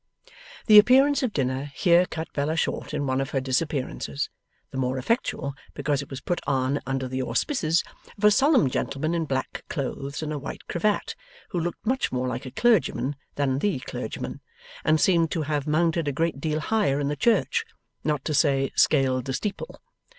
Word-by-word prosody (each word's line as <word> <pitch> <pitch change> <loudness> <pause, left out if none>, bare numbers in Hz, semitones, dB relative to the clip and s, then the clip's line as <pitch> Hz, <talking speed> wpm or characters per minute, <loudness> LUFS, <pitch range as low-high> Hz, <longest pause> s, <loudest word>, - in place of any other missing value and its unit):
The 210 -2 +10
appearance 270 +6 +5
of 255 -4 0
dinner 130 -3 -1
here 175 -1 +4
cut 160 0 -6
Bella 150 +3 0
short - - -2
in 150 -1 -2
one 130 0 0
of 135 - -3
her 140 - 0
disappearances: 135 +1 -2 0.4
the 135 - -6
more 130 0 0
effectually, 140 - -1 0.2
because 145 0 0
it 140 - -10
was 135 - -7
put 175 - -2
on 135 +1 +1
under 135 -1 -1
the 130 +1 -3
auspices 165 - +1 0.3
of 200 - -12
a 210 - +7
solemn 270 - +4
gentleman 145 +5 -2
in 165 -1 0
black 130 -3 -3
clothes 140 +1 -4
and 155 0 -3
a 150 - -3
white 140 - -7
cravat, 205 +4 0 0.4
who 175 - -2
looked 175 +5 -4
much 260 +4 0
more 130 0 -1
like 125 +1 -4
a - - -4
clergyman 215 - +2 0.2
than 135 -2 0
THE 200 -1 +1
clergyman, - - -5 0.4
and 155 - +3
seemed 165 -1 +3
to 160 - -1
have 145 -1 -2
mounted 165 +1 +1
a - - +1
great 160 0 -1
deal 155 0 -1
higher 195 -7 +1
in 145 - -1
the 145 - -1
church: 240 - +2 0.4
not 150 -3 -1
to 155 - -1
say, 135 -2 +2
scaled 130 -4 +3
the 135 - -3
steeple. 205 +9 -4
150 Hz, 185 wpm, -25 LUFS, 135-175 Hz, 0.4 s, The